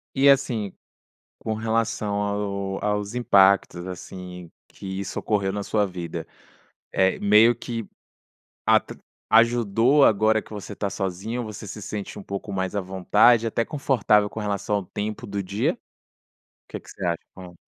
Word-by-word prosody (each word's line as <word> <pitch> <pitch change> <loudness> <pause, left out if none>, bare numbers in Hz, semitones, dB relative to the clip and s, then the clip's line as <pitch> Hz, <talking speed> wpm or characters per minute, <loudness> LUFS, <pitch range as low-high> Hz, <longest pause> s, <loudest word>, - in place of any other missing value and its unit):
E 140 +1 +5
assim, 120 -8 +2 0.7
com 110 - -3
relação 110 -1 -1
ao 100 -1 -2
aos 105 +1 -1
impactos, 100 -6 +3
assim, 90 -1 -8 0.2
que - - -11
isso 95 -1 -5
ocorreu 100 -3 0
na 100 0 -3
sua 105 0 +1
vida, 90 -3 -6 0.7
eh, 95 0 +2
meio 105 +3 +6
que 115 -1 -5 0.8
atr - - +2 0.3
ajudou, 115 +4 +4
agora 110 -1 +4
que - - -19
você 105 -1 -7
está 100 0 -3
sozinho, 100 +6 -3
você 105 -1 -8
se 105 +2 -7
sente 105 0 -6
um 100 - -8
pouco 100 +1 -6
mais 95 0 -2
à 100 - 0
vontade, 105 +5 +3
até 115 +1 0
confortável 110 -8 +2
com 110 - -7
relação 105 0 -1
ao 100 - -5
tempo 105 +3 -5
do 100 0 -3
dia? 100 +3 0
O - - -25 0.7
que - - -6
que - - -15
você 95 - -7
acha? 85 -1 0 0.2
Hã. 90 -2 -11
105 Hz, 155 wpm, -24 LUFS, 95-110 Hz, 0.8 s, meio